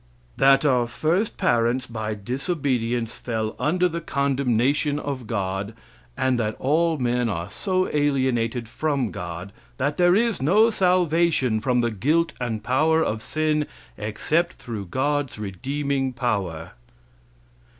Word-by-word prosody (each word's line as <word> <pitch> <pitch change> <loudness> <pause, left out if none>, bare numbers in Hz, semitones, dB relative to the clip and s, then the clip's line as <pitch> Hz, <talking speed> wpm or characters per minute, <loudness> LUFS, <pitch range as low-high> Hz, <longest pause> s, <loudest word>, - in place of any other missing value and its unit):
"That 135 +2 +5
our 125 -4 +3
first 160 - 0
parents, 120 +2 +2
by 110 -3 -4
disobedience, 125 - -2
fell 110 -2 -3
under 180 +4 +2
the 170 -1 -4
condemnation 140 0 +1
of 140 -5 -4
God, 100 -1 -3 0.4
and 130 -2 +1
that 110 -1 -1
all 160 +4 +2
men 125 -2 0
are 90 -1 -4
so 185 -2 0
alienated 130 -5 +1
from 140 -3 -1
God 90 +3 -6 0.2
that 145 +2 -1
there 175 0 +5
is 230 - +1
no 210 +11 +4
salvation 170 - +2
from 125 +1 +1
the 120 0 0
guilt 155 - +1
and 110 -3 -2
power 155 +7 +3
of 110 -5 -2
sin 155 +2 0 0.3
except 155 - -1
through 110 -5 -6
God's 140 +5 -1
redeeming 135 +7 -2
power." 100 -10 -2
130 Hz, 130 wpm, -24 LUFS, 115-155 Hz, 0.4 s, That